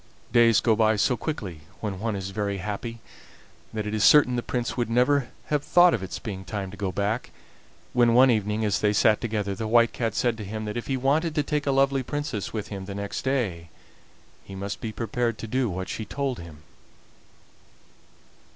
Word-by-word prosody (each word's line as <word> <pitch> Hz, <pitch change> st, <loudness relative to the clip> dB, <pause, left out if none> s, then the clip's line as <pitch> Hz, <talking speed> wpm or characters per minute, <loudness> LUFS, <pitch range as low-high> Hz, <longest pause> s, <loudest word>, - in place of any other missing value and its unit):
Days 115 Hz, -2 st, +5 dB
go 115 Hz, -2 st, +3 dB
by 110 Hz, 0 st, +3 dB
so 125 Hz, +5 st, +2 dB
quickly 105 Hz, -, -5 dB, 0.2 s
when 100 Hz, -4 st, -4 dB
one 110 Hz, 0 st, -2 dB
is 95 Hz, 0 st, -4 dB
very 100 Hz, 0 st, -2 dB
happy 105 Hz, +4 st, -5 dB, 0.7 s
that 105 Hz, -1 st, -3 dB
it 105 Hz, -, -3 dB
is 110 Hz, -1 st, +1 dB
certain 145 Hz, -4 st, +6 dB
the 120 Hz, -, 0 dB
Prince 120 Hz, 0 st, -3 dB
would 120 Hz, -2 st, -1 dB
never 125 Hz, +2 st, +2 dB, 0.2 s
have 145 Hz, -1 st, +1 dB
thought 175 Hz, +1 st, +5 dB
of 110 Hz, -, -1 dB
its 95 Hz, -, -5 dB
being 95 Hz, -4 st, -6 dB
time 95 Hz, -1 st, -5 dB
to -, -, -9 dB
go 100 Hz, -1 st, -2 dB
back, 105 Hz, +5 st, -1 dB, 0.6 s
when 120 Hz, -1 st, +4 dB
one 130 Hz, +1 st, +7 dB
evening 105 Hz, 0 st, 0 dB
as 100 Hz, -2 st, +1 dB
they 105 Hz, -1 st, +2 dB
sat 105 Hz, +1 st, +3 dB
together 105 Hz, -4 st, -2 dB
the 110 Hz, +3 st, -4 dB
White 115 Hz, +1 st, +4 dB
Cat 115 Hz, -3 st, -2 dB
said 120 Hz, -2 st, +1 dB
to -, -, -4 dB
him 110 Hz, +2 st, -5 dB
that 105 Hz, -, -4 dB
if 120 Hz, -, -4 dB
he 135 Hz, -, 0 dB
wanted 150 Hz, +5 st, +1 dB
to 150 Hz, -, +2 dB
take 150 Hz, 0 st, -2 dB
a -, -, +3 dB
lovely 135 Hz, 0 st, +3 dB
princess 145 Hz, -6 st, -3 dB
home -, -, -6 dB
with 105 Hz, 0 st, -5 dB
him 95 Hz, -2 st, -6 dB
the 100 Hz, 0 st, -6 dB
next 100 Hz, 0 st, -4 dB
day 105 Hz, -12 st, -1 dB, 0.7 s
he 95 Hz, -, -10 dB
must 100 Hz, +1 st, -5 dB
be 110 Hz, -, -3 dB
prepared 115 Hz, +1 st, -2 dB
to -, -, -6 dB
do 125 Hz, +1 st, 0 dB
what 95 Hz, 0 st, -4 dB
she 110 Hz, -, -4 dB
told 135 Hz, +3 st, -3 dB
him. 80 Hz, -3 st, -11 dB
110 Hz, 210 wpm, -26 LUFS, 100-125 Hz, 0.7 s, one